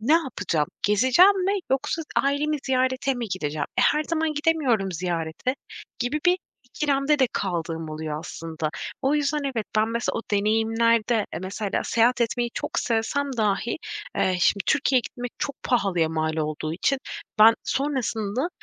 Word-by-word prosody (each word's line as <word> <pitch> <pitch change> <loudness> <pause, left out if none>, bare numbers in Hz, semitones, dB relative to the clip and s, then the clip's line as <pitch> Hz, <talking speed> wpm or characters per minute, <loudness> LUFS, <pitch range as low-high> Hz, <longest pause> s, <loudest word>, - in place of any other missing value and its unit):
ne 240 +8 +2
yapacağım, 205 - +1 0.2
gezeceğim 260 - +5
mi 390 - +2 0.2
yoksa 270 +4 0
ailemi 290 +2 +1
ziyarete 260 +1 +1
mi 240 -3 -4
gideceğim? 155 -5 -2
E, - - +5
her 300 - +3
zaman 320 -1 -1
gidemiyorum 275 - +1
ziyarete 170 +6 -2 0.4
gibi 255 +5 -1
bir 360 +1 +4 0.3
ikilemde 280 +3 +1
de 260 - +4
kaldığım 165 -4 -3
oluyor 155 -1 -4
aslında. 160 -2 -5 0.3
O 270 +2 +2
yüzden 295 0 +1
evet, 245 -6 -2
ben 215 +1 +3
mesela 235 +1 -1
o - - -4
deneyimlerde 225 +2 +2
mesela 195 +2 -2
seyahat 240 +2 +2
etmeyi 240 +1 0
çok - - -2
sevsem 260 +5 0
dahi, 215 +1 0 0.4
eee, 185 -1 +2
şimdi 195 +1 +3
Türkiye'ye 270 -3 +3
gitmek 245 +1 -7
çok 280 - -4
pahalıya 195 -9 +1
mal 160 0 -1
olduğu 155 0 -2
için 265 +11 +1 0.4
ben 220 +1 +8
sonrasında 260 -2 -1
230 Hz, 145 wpm, -25 LUFS, 190-275 Hz, 0.4 s, ben